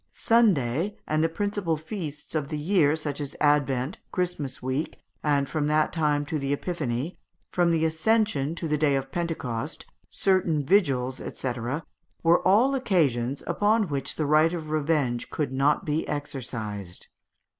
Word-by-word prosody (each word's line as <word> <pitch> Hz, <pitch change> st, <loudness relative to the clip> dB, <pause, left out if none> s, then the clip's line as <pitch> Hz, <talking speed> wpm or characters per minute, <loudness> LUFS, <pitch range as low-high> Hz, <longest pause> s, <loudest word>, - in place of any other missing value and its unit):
Sunday 195 Hz, -, +2 dB
and 155 Hz, +1 st, +1 dB
the 165 Hz, -, +2 dB
principal 200 Hz, -2 st, -1 dB
feasts 155 Hz, -2 st, -6 dB
of 155 Hz, -3 st, -1 dB
the 155 Hz, 0 st, -3 dB
year, 155 Hz, -2 st, +3 dB
such 150 Hz, -2 st, -4 dB
as 145 Hz, 0 st, -5 dB
Advent, 145 Hz, 0 st, +1 dB
Christmas 175 Hz, -7 st, -2 dB
week, 130 Hz, +4 st, -3 dB, 0.3 s
and 145 Hz, -2 st, +2 dB
from 150 Hz, -1 st, -1 dB
that 155 Hz, 0 st, +2 dB
time 150 Hz, -3 st, +1 dB
to 150 Hz, +1 st, -2 dB
the 140 Hz, 0 st, -2 dB
Epiphany, 145 Hz, -2 st, -3 dB, 0.3 s
from 175 Hz, -1 st, +2 dB
the 165 Hz, -1 st, +2 dB
Ascension 160 Hz, -3 st, +1 dB
to 170 Hz, -, -4 dB
the 150 Hz, -1 st, 0 dB
Day 145 Hz, -2 st, +3 dB
of 135 Hz, 0 st, -3 dB
Pentecost, 155 Hz, -4 st, -3 dB, 0.2 s
certain 175 Hz, -7 st, +1 dB
vigils, 135 Hz, -8 st, +2 dB, 0.2 s
&c., 130 Hz, -2 st, -1 dB, 0.7 s
were 170 Hz, +1 st, +5 dB
all 230 Hz, +8 st, +5 dB
occasions 140 Hz, -, +1 dB
upon 210 Hz, -2 st, +2 dB
which 140 Hz, -2 st, -2 dB
the 155 Hz, -, -1 dB
right 155 Hz, +3 st, +4 dB
of 155 Hz, -3 st, -5 dB
revenge 145 Hz, -6 st, 0 dB
could 140 Hz, -4 st, -2 dB
not 140 Hz, +3 st, +2 dB
be 155 Hz, +1 st, -1 dB
exercised. 110 Hz, -10 st, -5 dB
150 Hz, 150 wpm, -26 LUFS, 140-170 Hz, 0.7 s, were